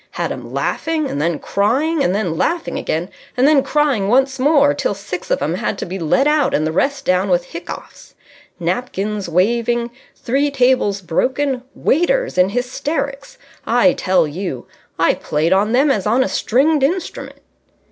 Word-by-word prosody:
Had - - -1
'em - - -7
laughing 315 -2 -1
and 145 - -3
then 165 0 0
crying 275 - 0
and 180 - +1
then 190 -6 -1
laughing 335 - -1
again 165 +3 -2 0.3
and 255 +3 +4
then 295 -2 +5
crying 280 -9 +1
once 265 +4 +2
more 280 - +4
till 200 - -2
six 195 -2 -7
of - - 0
'em 155 +3 -1
had 200 +2 -2
to - - -4
be 190 +2 -5
led 180 - +2
out 300 -2 +2
and 155 - 0
the 155 - -1
rest 275 - -1
down 185 +2 +1
with 175 -1 +2
hiccoughs. 175 +2 -9 0.4
Napkins 200 +1 -2
waving... 235 +6 +1 0.2
three 275 +4 0
tables 250 -7 +1
broken... 260 - 0
waiters - - +1
in 180 +1 +4
hysterics. 280 - -3 0.3
I 245 +4 +4
tell 185 -4 +1
you, 150 -5 -5 0.3
I - - +3
played 155 +4 0
on 205 +3 +2
them 275 +4 +3
as 210 -5 -1
on 240 +5 +3
a - - -1
stringed 285 +6 +2
instrument...." 335 +7 -2
235 Hz, 170 wpm, -18 LUFS, 185-280 Hz, 0.4 s, then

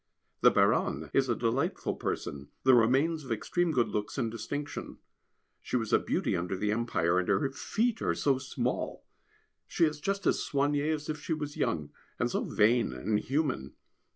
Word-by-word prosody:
The - - +7
Baronne 75 +1 +1
is 135 -1 +2
a 120 - +2
delightful 130 - 0
person, 70 0 -4
the 130 - +6
remains 135 +7 +3
of 130 - -8
extreme 170 +10 0
good 125 -6 +2
looks 105 +5 -3
and 115 -4 0
distinction. 145 +5 -5 0.6
She - - -4
was 115 -3 -1
a - - +6
beauty - - -1
under 90 +2 -2
the 105 +2 0
Empire, 90 -6 +1
and 90 - -2
her 105 +7 +2
feet 225 - -1
are - - +1
so 135 -2 +2
small, 130 -1 -3 0.6
she 170 - +2
is 150 -1 -2
just 195 +2 -2
as - - +3
soignée 145 +2 +1
as 150 -1 -3
if 150 -1 -4
she 160 - -2
was 150 -1 -5
young, 75 -3 -1 0.3
and - - 0
so - - 0
vain 115 - +2
and 105 +12 0
human. 135 - -1
130 Hz, 180 wpm, -30 LUFS, 105-150 Hz, 0.6 s, The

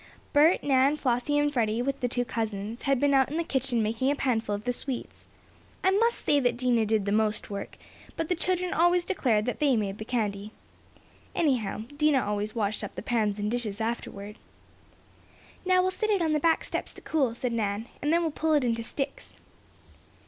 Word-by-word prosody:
Bert, 310 +4 +5
Nan, 275 +1 +3
Flossie 250 +2 0
and 290 0 +1
Freddie, 230 -2 +1
with 275 +1 -2
the 250 - 0
two 245 0 -1
cousins, 220 0 -4
had 275 -2 +1
been 285 +1 +3
out 265 -1 +4
in 305 - -3
the 335 - +1
kitchen 265 -6 0
making 225 +5 0
a 285 - +2
panful 225 -6 0
of 205 - -7
the 245 - 0
sweets. 255 0 -5 0.6
I 380 - +4
must 455 +4 +2
say 290 - +4
that 245 -3 +1
Dinah 240 -3 +2
did 215 -2 +1
the 200 - -1
most 215 0 0
work, 200 0 -6 0.4
but 325 - -1
the 360 - +1
children 365 +1 -1
always 350 0 +3
declared 230 - +1
that 250 - -3
they 285 -4 +3
made 205 -2 -2
the - - -4
candy. 215 -3 -2 0.8
Anyhow, 240 - 0
Dinah 300 -3 +3
always 210 +2 -2
washed 215 -2 -1
up - - -6
the - - -6
pans 215 -4 0
and 210 +1 -2
dishes 230 -4 -2
afterward. 215 -2 -4 1.3
"Now 365 0 +4
we'll 370 - +1
set 435 +4 -2
it 410 -2 +3
out 335 - +1
on 315 - +1
the 305 - +2
back 325 +2 +2
steps - - -3
to - - -12
cool," 270 -7 0
said 245 0 -2
Nan, 210 -1 -1 0.2
"and 295 - 0
then 340 +1 +3
we'll 325 - 0
pull 315 +1 0
it 290 - +3
into 230 -2 0
sticks." 275 +4 -5
245 Hz, 205 wpm, -27 LUFS, 220-295 Hz, 1.3 s, Bert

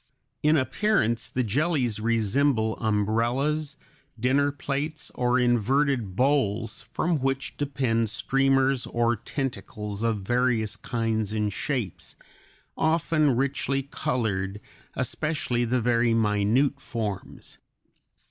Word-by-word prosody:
In 155 +1 +4
appearance 125 - +1
the 130 - -1
jellies 125 - 0
resemble 115 +1 +1
umbrellas, 120 +8 0 0.4
dinner 140 +4 +2
plates, 145 +2 -4
or 125 0 +1
inverted 125 -2 +1
bowls, 115 -4 0
from 165 -2 0
which 135 -2 -2
depend 130 -6 0
streamers 135 +2 +2
or 120 0 +1
tentacles 105 -4 -4
of 115 -3 0
various 120 -1 +1
kinds 115 -3 -2
and 105 -2 -1
shapes, 120 - -3 0.6
often 160 -3 +2
richly 135 +1 0
colored, 110 -9 -2 0.4
especially 130 -2 -1
the 125 +1 +1
very 115 0 +2
minute 110 +6 +2
forms. 110 -7 -6
125 Hz, 100 wpm, -26 LUFS, 110-140 Hz, 0.6 s, In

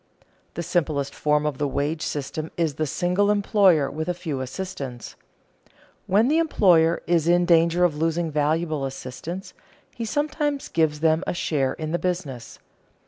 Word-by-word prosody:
The 170 - -3
simplest 155 -5 -1
form 150 0 +1
of 150 -3 -2
the 145 - +1
wage 145 +4 -2
system 150 +2 -4
is 165 -4 +1
the 155 +2 -2
single 180 +7 +1
employer 200 -7 +3
with 160 +3 -4
a 180 - -1
few 150 -6 -4
assistants. 130 - -6 0.9
When 210 +5 +3
the 310 +4 +3
employer 175 - +3
is 170 -2 +1
in 175 +1 +4
danger 170 0 +4
of 170 -4 +2
losing 165 +1 -1
valuable 155 0 0
assistants, 135 +7 -7 0.4
he 230 - -5
sometimes 295 +2 -1
gives 155 -2 +1
them 160 +1 +3
a - - -1
share 140 -6 0
in 155 -1 -5
the 175 - 0
business. 170 -10 -4
165 Hz, 155 wpm, -24 LUFS, 150-180 Hz, 0.9 s, in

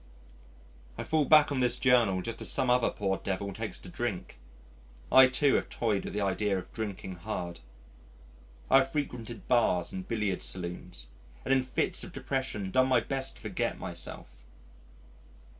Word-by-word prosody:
I - - -3
fall 155 -2 +1
back 155 -1 +6
on 140 - 0
this 125 -1 +2
Journal 115 -8 +3
just 115 -1 -5
as - - -2
some 130 - +2
other 125 -1 +3
poor 95 -1 -1
devil 100 0 -3
takes - - -4
to - - -11
drink. - - -4 0.7
I, 130 0 +9
too, 135 +2 +2
have - - +1
toyed 110 -4 -1
with - - -5
the 105 - 0
idea 100 0 0
of 90 - -8
drinking 100 -4 -5
hard. 85 -2 -5 1.1
I 135 - +8
have 135 0 -1
frequented 125 -6 -4
bars 90 -8 +2
and 95 -1 -6
billiards 105 -5 -1
saloons 85 -9 -5 0.4
and 135 - +3
in 135 - +4
fits 130 +8 -1
of 185 - -9
depression 130 -8 -3
done 130 +3 +4
my 130 -2 +4
best 135 +3 -3
to - - -14
forget - - -2
myself. - - -6
115 Hz, 165 wpm, -30 LUFS, 95-130 Hz, 1.1 s, I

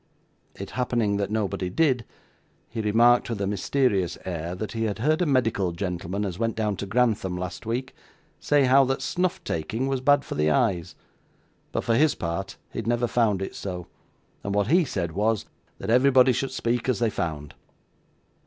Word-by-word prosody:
It 100 - -7
happening 120 -5 0
that 100 -1 -1
nobody 100 -4 -1
did, 130 - +1 0.6
he 115 - -4
remarked 115 +4 +4
with 115 -3 -3
a 100 - 0
mysterious 100 -2 0
air 85 -1 -4
that 105 +3 -5
he 115 0 -2
had 105 -2 -2
heard 155 +8 +1
a 175 - +2
medical 115 -9 +1
gentleman 90 +2 -3
as 90 -2 -5
went 115 -1 0
down 105 -2 0
to 100 - -5
Grantham 105 -5 +1
last 90 +4 -6
week, 125 +4 -2 0.5
say 145 -1 +3
how 135 +2 +6
that 135 +1 -1
snuff 180 0 -1
taking 110 +11 -2
was 135 -1 -1
bad 145 +1 +4
for - - -5
the 75 +1 +1
eyes; 90 0 +1 0.8
but - - -2
for 115 - +1
his 150 +5 +3
part 95 +4 -4 0.2
he - - -3
had - - -5
never 120 +1 +2
found 110 -5 +1
it - - -5
so, 90 -3 -5 0.6
and 100 0 -2
what 105 +1 +1
he 175 0 +5
said 90 - -3
was, 105 +4 0 0.3
that - - -3
everybody 130 +1 +5
should 135 +3 -2
speak 120 -1 -1
as 130 - +2
they 115 -2 +1
found. 75 -6 -4
110 Hz, 185 wpm, -25 LUFS, 95-125 Hz, 0.8 s, how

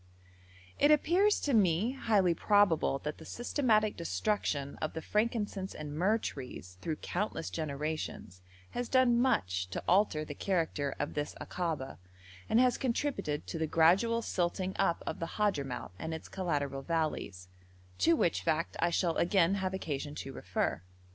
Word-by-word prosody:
It 290 - +5
appears 350 +8 +4
to 285 - 0
me 200 +1 +3
highly 210 -9 +2
probable 200 -6 +3
that 150 0 -4
the - - -10
systematic 220 - +1
destruction 170 -6 -1
of 155 - -3
the 160 - -4
frankincense 210 -3 -1
and 150 -1 -6
myrrh 190 +8 +2
trees 125 - -7
through 160 +5 -2
countless 180 +2 -3
generations 150 - -4 0.3
has 245 -1 -3
done 250 -2 +4
much 90 - +1
to - - -4
alter 175 -5 +3
the 145 - -6
character 160 -5 -1
of - - -3
this 145 0 -3
Akaba, 155 - -3 0.5
and 220 - +4
has 250 -1 +3
contributed 235 - -1
to 165 - -5
the 160 - 0
gradual 195 +10 +4
silting 185 0 -1
up 170 - +1
of - - -4
the 165 - -4
Hadhramout 140 - -1
and 160 - -3
its 160 - -8
collateral 145 -7 -2
valleys, 150 - -2 0.5
to 165 - +5
which 170 - +1
fact 165 0 0
I 170 - +3
shall 170 -1 +1
again 180 0 +3
have 190 -1 -1
occasion 145 -5 -4
to 135 -2 -6
refer. 85 - -2
170 Hz, 155 wpm, -32 LUFS, 150-210 Hz, 0.5 s, It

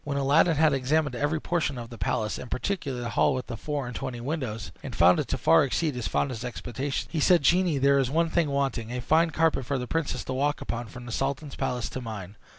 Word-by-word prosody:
When 140 -1 -3
Aladdin 145 +4 +4
had 155 0 +4
examined 140 +1 +1
every 145 +4 0
portion 155 -5 -1
of 120 -1 -7
the 120 - -8
palace, 110 +3 -1
and 125 - -8
particularly 135 -6 -2
the 120 - -3
hall 140 - +3
with 130 - -3
the 120 - -6
four 145 +3 -3
and 120 0 -7
twenty 130 -3 -4
windows, 120 - -4
and 130 -5 -7
found 90 0 +5
it - - -1
to - - -1
far 80 0 +5
exceed 150 +3 0
his 125 -3 -3
fondest 125 -4 -1
expectations, 125 +2 -4
he 165 - -1
said, 170 +1 +4
"Genie, 175 +1 +3
there 140 +1 +4
is 130 -2 +1
one 165 +3 +1
thing 165 -3 +2
wanting 135 -5 -1
a 125 - -3
fine 160 +6 +3
carpet 160 -3 +1
for 135 +3 -1
the 125 - -3
princess 160 +3 -2
to 130 - -4
walk 145 +3 0
upon 120 0 -4
from 120 +2 -10
the 120 - -7
sultan's 135 +4 -2
palace 125 -2 -2
to 130 - -5
mine. 105 -4 -7
135 Hz, 245 wpm, -27 LUFS, 120-150 Hz, -, found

